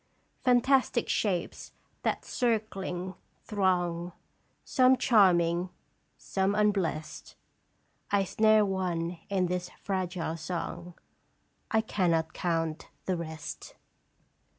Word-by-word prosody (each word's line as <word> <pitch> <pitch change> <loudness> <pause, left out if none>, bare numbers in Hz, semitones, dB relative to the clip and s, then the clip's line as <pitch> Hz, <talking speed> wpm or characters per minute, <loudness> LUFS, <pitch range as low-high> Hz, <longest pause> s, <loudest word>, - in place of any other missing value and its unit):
" - - -43
Fantastic 250 0 +3
shapes 185 -5 -1 0.3
that, - - -1
circling, 195 -6 -1 0.3
throng, 175 -4 0 0.5
Some 255 0 +4
charming, 180 -7 +4 0.5
some 195 +1 0
unblest; 195 -7 -1 0.7
I 200 -1 +3
snare 215 +2 +4
one 180 -3 -2
in 190 -2 +1
this 180 0 -2
fragile 180 -4 -2
song, 170 +1 -5 0.7
I 220 - +3
cannot 170 -7 0
count 165 -2 -2 0.2
the 185 - 0
rest." 160 -2 -7
185 Hz, 90 wpm, -29 LUFS, 170-210 Hz, 0.7 s, Some